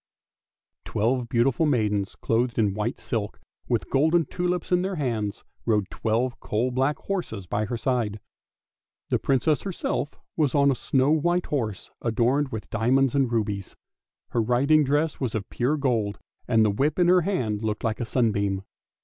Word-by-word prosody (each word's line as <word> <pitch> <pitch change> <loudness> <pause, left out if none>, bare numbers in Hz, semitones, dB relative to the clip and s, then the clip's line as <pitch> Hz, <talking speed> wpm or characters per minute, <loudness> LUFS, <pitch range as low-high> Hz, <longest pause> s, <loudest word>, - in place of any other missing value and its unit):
Twelve 120 +2 0
beautiful 130 +6 +2
maidens 105 -7 0
clothed 120 +1 0
in 105 -4 +2
white 105 +5 -2
silk, 110 -4 -3 0.3
with - - -1
golden 160 +4 +3
tulips 180 +3 -2
in 180 0 +4
their 190 +1 -2
hands, 115 - -2 0.2
rode 105 -4 +1
twelve 120 +3 -1
coal 120 +4 -1
black 135 +4 +1
horses 170 - -4
by 105 +4 -1
her 120 +2 -3
side. 115 -4 -1 0.9
The - - +3
Princess 140 +3 +2
herself 175 -5 -3 0.2
was 150 -4 +1
on 140 -1 +5
a - - 0
snow 130 +3 +1
white 175 +3 +2
horse, 110 -9 -3
adorned 125 +5 +1
with 110 -3 -7
diamonds 125 +4 +2
and 135 -4 +2
rubies; 105 -4 -2 0.5
her 120 - +1
riding 135 +7 +3
dress 145 +3 0
was 125 -5 -2
of 105 -3 -3
pure 130 +6 +1
gold, 115 -7 0 0.3
and 110 -2 +4
the 105 - +3
whip 140 +9 0
in 175 -1 +4
her 180 0 +6
hand 120 - -1
looked 110 -1 -2
like 110 -1 -1
a 120 - -1
sunbeam. 100 -5 0
125 Hz, 165 wpm, -25 LUFS, 110-145 Hz, 0.9 s, her